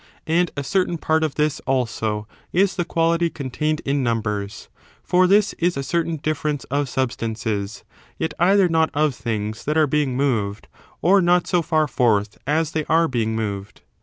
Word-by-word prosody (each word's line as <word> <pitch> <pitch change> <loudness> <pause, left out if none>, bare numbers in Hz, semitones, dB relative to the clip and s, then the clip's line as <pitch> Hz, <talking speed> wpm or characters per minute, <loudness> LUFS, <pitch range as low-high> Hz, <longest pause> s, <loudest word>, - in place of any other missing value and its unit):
And 170 +2 +2
a 140 - -2
certain 180 +2 0
part 160 0 +1
of 155 -3 -1
this, 150 -1 0
also, 110 -5 -1 0.2
is 190 +2 +2
the 175 - 0
quality 170 0 +1
contained 150 +2 -2
in 140 0 +1
numbers; 105 -4 -2 0.4
for 185 +1 +3
this 205 +2 +3
is 175 -2 +1
a 140 - -2
certain 165 +4 -1
diife 155 +1 -2
rence 150 -2 -1
of 140 -1 0
substances, 110 -5 -3 0.3
yet 160 - -2
either 190 +2 +5
not 160 -1 +2
of 150 -1 +2
things 110 -2 -4
that 150 +2 0
are 155 - +5
being 145 -3 0
moved 110 -7 -1 0.4
or 195 +3 +5
not 175 0 +3
so 175 -2 +1
far 155 -1 +1
forth 110 -6 +1
as 155 +2 +1
they 155 -1 -1
are 165 +1 +3
being 115 -4 -1
moved. 105 -2 -4
150 Hz, 175 wpm, -22 LUFS, 115-165 Hz, 0.4 s, either